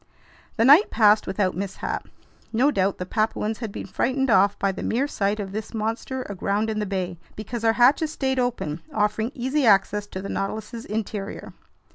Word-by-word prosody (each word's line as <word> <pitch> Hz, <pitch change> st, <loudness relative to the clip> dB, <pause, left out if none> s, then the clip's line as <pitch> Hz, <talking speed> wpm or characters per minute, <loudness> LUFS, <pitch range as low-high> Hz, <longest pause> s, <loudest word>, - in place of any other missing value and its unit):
The 225 Hz, -, +3 dB
night 300 Hz, -, +7 dB
passed 210 Hz, -1 st, +4 dB
without 190 Hz, -2 st, 0 dB
mishap. 190 Hz, +1 st, -4 dB, 0.4 s
No 255 Hz, +6 st, +3 dB
doubt 195 Hz, -4 st, 0 dB
the 180 Hz, -, -4 dB
Papuans 215 Hz, +1 st, -1 dB
had 225 Hz, -4 st, -5 dB
been -, -, -6 dB
frightened 265 Hz, 0 st, 0 dB
off 200 Hz, 0 st, +4 dB
by 195 Hz, -, +1 dB
the 190 Hz, -, -7 dB
mere 260 Hz, +5 st, 0 dB
sight 205 Hz, -5 st, -1 dB
of 195 Hz, -2 st, -4 dB
this 215 Hz, +3 st, -6 dB
monster 230 Hz, +4 st, -3 dB
aground 205 Hz, +2 st, -1 dB
in 215 Hz, -, -2 dB
the 210 Hz, -, -2 dB
bay, 185 Hz, -3 st, -3 dB, 0.2 s
because 225 Hz, +2 st, -6 dB
our 225 Hz, 0 st, +4 dB
hatches 270 Hz, +7 st, +4 dB
stayed 265 Hz, -3 st, -1 dB
open, 225 Hz, -11 st, -2 dB
offering 215 Hz, +2 st, 0 dB
easy 265 Hz, +3 st, 0 dB
access 205 Hz, -1 st, +3 dB
to 190 Hz, -, -6 dB
the 195 Hz, -, -6 dB
Nautilus's 220 Hz, +4 st, -4 dB
interior. 210 Hz, -1 st, -5 dB
215 Hz, 180 wpm, -24 LUFS, 200-240 Hz, 0.4 s, night